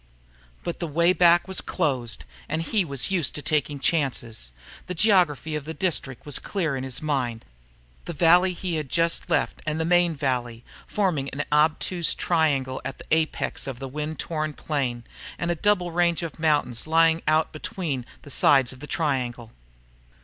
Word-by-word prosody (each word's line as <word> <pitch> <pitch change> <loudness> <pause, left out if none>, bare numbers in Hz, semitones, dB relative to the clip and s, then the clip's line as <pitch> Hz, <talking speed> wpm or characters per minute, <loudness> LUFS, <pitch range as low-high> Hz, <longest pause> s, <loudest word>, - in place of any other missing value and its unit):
But 170 - -4
the 170 - -2
way 170 +4 +3
back 175 0 +5
was 190 - -1
closed 130 -9 -2 0.2
and 155 +2 -1
he 205 +3 +1
was 140 0 -2
used 175 -6 +1
to 150 - -5
taking 150 -1 0
chances. 120 - -1 0.4
The 180 - -4
geography 175 -6 +3
of 150 - -3
the 160 +1 -6
district 145 -7 -2
was 145 -3 -3
clear 165 -8 -2
in 130 - -4
his 130 +2 -3
mind 125 -6 -1 0.6
the 170 - -5
valley 175 +3 +5
he 175 -2 -3
had 150 -4 -4
just 165 +2 +1
left - - 0
and 155 +1 -2
the 160 - 0
main 175 -1 +3
valley, 125 -4 -2 0.2
forming 170 -10 0
an 140 - -3
obtuse 160 +3 +2 0.2
angle 140 -6 +1
with 135 - -5
the - - -12
apex 160 -3 0
out 135 - -4
on - - -17
the 135 - -5
wind 150 +3 -4
torn 155 -2 -3
plain 130 -6 -2 0.3
and 170 0 -1
a - - 0
double 180 -1 +1
range 170 0 +1
of 165 -1 -6
mountains 150 -6 +1
lying 165 0 +4
out 155 +1 +3
between 155 -4 -4 0.2
the 145 - -10
sides 135 -2 +4
of 130 - -14
the 150 - -8
triangle. 125 -8 -2
155 Hz, 180 wpm, -25 LUFS, 135-170 Hz, 0.6 s, back